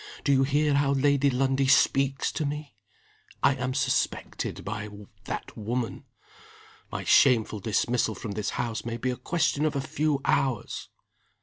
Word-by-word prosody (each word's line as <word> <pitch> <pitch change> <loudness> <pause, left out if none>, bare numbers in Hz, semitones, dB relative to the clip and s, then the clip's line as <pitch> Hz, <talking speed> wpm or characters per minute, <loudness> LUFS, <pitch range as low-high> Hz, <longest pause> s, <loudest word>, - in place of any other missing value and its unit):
Do 140 - +2
you 135 -1 +4
hear 145 +2 +2
how 140 0 +2
Lady 140 0 +3
Lundie 135 +1 +1
speaks 135 0 +3
to - - -3
me? 150 -1 -4 0.7
I 140 - +5
am 130 0 -3
suspected 135 -2 -1
by 105 +1 -4 0.4
that - - -5
woman. 115 +2 -3 0.9
My - - -4
shameful 110 -5 +4
dismissal 110 +2 0
from 105 - -6
this 100 0 -2
house 120 -2 -2
may 115 0 -4
be 125 +2 -1
a - - -3
question 150 0 0
of 155 -1 0
a - - +1
few 145 +1 0
hours." 130 -6 0
135 Hz, 150 wpm, -27 LUFS, 120-140 Hz, 0.9 s, I